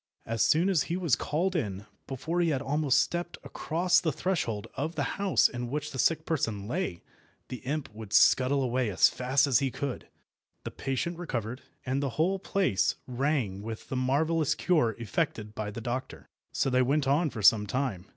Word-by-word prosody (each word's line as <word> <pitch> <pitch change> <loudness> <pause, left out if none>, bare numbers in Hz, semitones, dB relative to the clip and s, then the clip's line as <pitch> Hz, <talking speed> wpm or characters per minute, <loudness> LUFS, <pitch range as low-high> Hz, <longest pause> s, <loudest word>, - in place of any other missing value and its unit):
As 115 -1 -2
soon 155 +11 +3
as 185 -6 +3
he 170 - 0
was 170 -9 +2
called 180 +5 -1
in, 105 - -2 0.2
before 160 +7 -2
he 170 - +2
had 140 -4 0
almost 145 -1 +2
stepped 175 0 -3
across 175 +2 +1
the 160 - 0
threshold 145 - -2
of 160 +4 -3
the 145 - 0 0.2
house 195 -2 +4
in 120 -1 -5
which 150 +2 -3
the 130 - -6
sick 160 +2 +2
person 110 -10 -2
lay, 120 - -3 0.5
the 125 - -5
imp 145 +4 -3
would 110 -2 -9
scuttle 135 +4 +4
away 125 -2 0
as 95 - +5
fast 130 +3 +1
as 135 -4 +3
he 135 -2 0
could, 135 0 -5 0.6
the - - -5
patient 140 +6 -3
recovered, 125 -6 -4 0.2
and 135 +2 -1
the 140 - -1
whole 185 +5 +2
place 185 - +1
rang 125 -6 -1
with 110 +1 -7
the - - -3
marvellous 145 +4 +1
cure 135 - +1
effected 115 -3 -2
by 110 -1 -4
the 105 - -6
doctor. 120 +3 -5 0.2
So 135 - 0
they 125 0 +3
went 140 +2 +1
on 150 +4 +2
for 110 -6 -6
some 105 +1 +6
time. 105 -5 -2
135 Hz, 190 wpm, -29 LUFS, 115-160 Hz, 0.6 s, some